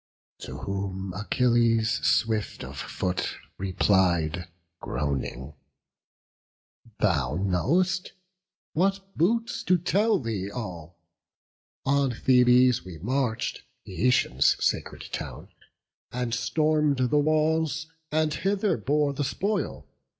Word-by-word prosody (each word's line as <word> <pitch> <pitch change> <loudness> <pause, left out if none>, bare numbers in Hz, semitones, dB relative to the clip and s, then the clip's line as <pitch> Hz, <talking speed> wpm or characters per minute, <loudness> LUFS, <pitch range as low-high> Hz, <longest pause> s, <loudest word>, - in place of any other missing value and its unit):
To - - -7
whom 95 -1 -4
Achilles, 115 +2 +2
swift 110 -2 +1
of - - -8
foot, 90 0 -3 0.2
replied, 90 -3 +1 0.3
Groaning, 70 -1 -3 1.4
"Thou 75 -9 +1
know'st; 160 - +1 0.6
what 195 +3 0
boots 230 +8 +1
to 180 - +4
tell 200 +6 +2
thee 105 -6 -3
all? 90 -7 -7 0.9
On 140 -1 +2
Thebes 125 -1 +4
we 90 -2 -9
march'd, 120 - -1 0.2
Eetion's 110 +6 +2
sacred - - -1
town, - - -6 0.6
And 125 -1 -2
storm'd 150 +3 +1
the 150 - +4
walls, 155 +1 +1 0.3
and 155 0 +1
hither 195 +2 0
bore 145 +5 +1
the 145 - -2
spoil. 200 +10 -2
125 Hz, 95 wpm, -26 LUFS, 95-155 Hz, 1.4 s, to